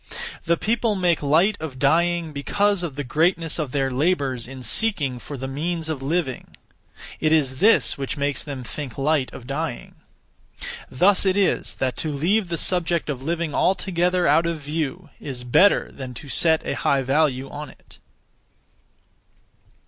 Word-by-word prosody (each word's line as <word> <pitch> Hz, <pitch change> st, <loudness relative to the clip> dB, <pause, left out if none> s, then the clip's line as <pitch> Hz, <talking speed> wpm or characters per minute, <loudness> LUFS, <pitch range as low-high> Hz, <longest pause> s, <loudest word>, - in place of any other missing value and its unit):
The 170 Hz, 0 st, +2 dB
people 225 Hz, +1 st, 0 dB
make 175 Hz, -4 st, +1 dB
light 165 Hz, +9 st, +3 dB
of 155 Hz, -5 st, -6 dB
dying 165 Hz, +3 st, +2 dB
because 200 Hz, +7 st, +1 dB
of 165 Hz, -6 st, -4 dB
the 145 Hz, -, -3 dB
greatness 165 Hz, +4 st, +1 dB
of 150 Hz, -5 st, -2 dB
their 135 Hz, -1 st, 0 dB
labours 135 Hz, -4 st, 0 dB
in 130 Hz, 0 st, -9 dB
seeking 145 Hz, -, +1 dB
for 140 Hz, +3 st, -8 dB
the 135 Hz, +1 st, -5 dB
means 160 Hz, +4 st, -3 dB
of 150 Hz, -4 st, -3 dB
living. 140 Hz, -2 st, -3 dB, 0.6 s
It 155 Hz, -, +1 dB
is 135 Hz, -5 st, +2 dB
this 210 Hz, -6 st, +4 dB
which 135 Hz, +2 st, -3 dB
makes 140 Hz, 0 st, 0 dB
them 140 Hz, -4 st, -6 dB
think 130 Hz, 0 st, -7 dB
light 140 Hz, -1 st, +1 dB
of 120 Hz, -, -10 dB
dying. 140 Hz, -1 st, -4 dB, 1.0 s
Thus 185 Hz, +9 st, +3 dB
it 190 Hz, 0 st, +2 dB
is 200 Hz, -2 st, +1 dB
that 130 Hz, -1 st, -1 dB
to 155 Hz, -, -2 dB
leave 180 Hz, +8 st, +1 dB
the 170 Hz, -1 st, -3 dB
subject 170 Hz, -3 st, 0 dB
of 130 Hz, -3 st, -6 dB
living 165 Hz, +1 st, -2 dB
altogether 180 Hz, 0 st, +1 dB
out 165 Hz, +1 st, +4 dB
of 165 Hz, -2 st, -3 dB
view 155 Hz, +3 st, -4 dB
is 130 Hz, -4 st, -6 dB
better 185 Hz, +11 st, +4 dB
than 130 Hz, -2 st, -8 dB
to 140 Hz, -, -10 dB
set 160 Hz, +3 st, +3 dB
a -, -, -1 dB
high 135 Hz, -1 st, +1 dB
value 135 Hz, -1 st, +1 dB
on 145 Hz, +2 st, -7 dB
it. -, -, -18 dB
155 Hz, 165 wpm, -23 LUFS, 135-175 Hz, 1.0 s, this